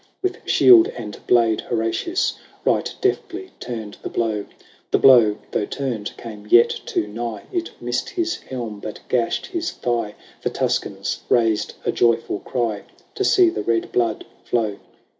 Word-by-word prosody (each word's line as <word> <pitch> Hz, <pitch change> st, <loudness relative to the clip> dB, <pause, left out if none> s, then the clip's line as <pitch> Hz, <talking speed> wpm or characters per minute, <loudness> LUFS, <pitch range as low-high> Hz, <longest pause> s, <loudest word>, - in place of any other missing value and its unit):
With 375 Hz, 0 st, -1 dB
shield 355 Hz, -2 st, +7 dB
and 105 Hz, -4 st, -7 dB
blade 115 Hz, -3 st, +4 dB
Horatius 120 Hz, -, -1 dB, 0.3 s
Right -, -, +2 dB
deftly 390 Hz, -2 st, -1 dB
turned 110 Hz, -4 st, -6 dB
the -, -, -5 dB
blow. 110 Hz, -3 st, -1 dB, 0.4 s
The -, -, +3 dB
blow, 115 Hz, -6 st, +6 dB
though 105 Hz, -, -1 dB
turned, 120 Hz, -7 st, -4 dB
came 105 Hz, -3 st, -9 dB
yet 120 Hz, 0 st, +7 dB, 0.2 s
too -, -, 0 dB
nigh; 115 Hz, +2 st, -5 dB
It 345 Hz, -2 st, -2 dB
missed -, -, -2 dB
his 345 Hz, -3 st, -1 dB
helm, 115 Hz, -5 st, -6 dB
but 105 Hz, -, -7 dB
gashed 120 Hz, -2 st, 0 dB
his 340 Hz, -3 st, -3 dB
thigh: 115 Hz, -4 st, -2 dB, 0.3 s
The -, -, 0 dB
Tuscans -, -, -2 dB
raised 115 Hz, -3 st, +2 dB
a -, -, +2 dB
joyful 115 Hz, -3 st, +1 dB
cry 115 Hz, -5 st, -2 dB, 0.3 s
To 405 Hz, -, -1 dB
see 365 Hz, -3 st, +5 dB
the -, -, -3 dB
red 115 Hz, -1 st, 0 dB
blood 115 Hz, -3 st, 0 dB, 0.2 s
flow. 110 Hz, -4 st, -1 dB
120 Hz, 150 wpm, -22 LUFS, -, 0.4 s, shield